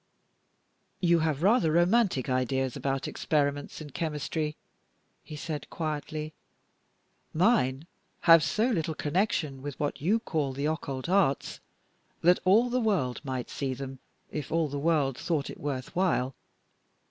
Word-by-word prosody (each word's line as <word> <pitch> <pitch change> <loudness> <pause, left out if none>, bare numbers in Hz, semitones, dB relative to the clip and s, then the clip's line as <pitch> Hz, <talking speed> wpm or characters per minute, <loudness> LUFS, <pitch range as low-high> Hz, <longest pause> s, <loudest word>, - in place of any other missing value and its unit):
"You 170 -2 +4
have 155 -1 0
rather 195 -5 +4
romantic 175 - +3
ideas 130 0 0
about 135 -1 -2
experiments 145 0 -1
in 150 -2 -8
chemistry," 150 0 -2 0.7
he 155 - -9
said, 150 0 -5
quietly. 155 -1 -4 1.0
"Mine 155 - +2 0.4
have 165 -2 +7
so 210 +10 +1
little 160 -6 -1
connection 155 - -1
with 145 -1 -6
what 145 -2 -2
you 195 +9 +3
call 155 - -2
the 140 +2 -3
occult 140 -3 -2
arts 180 -7 +1 0.6
that 180 +2 +5
all 225 +6 +5
the 250 0 +1
world 180 - 0
might 130 -3 -4
see 135 -2 -2
them, 135 0 -7 0.3
if 150 -3 -5
all 165 -1 +2
the 140 +1 -3
world 145 -4 +1
thought 155 -5 -1
it - - -11
worth 135 -3 -4
while. 165 -8 +1
150 Hz, 135 wpm, -28 LUFS, 135-170 Hz, 1.0 s, have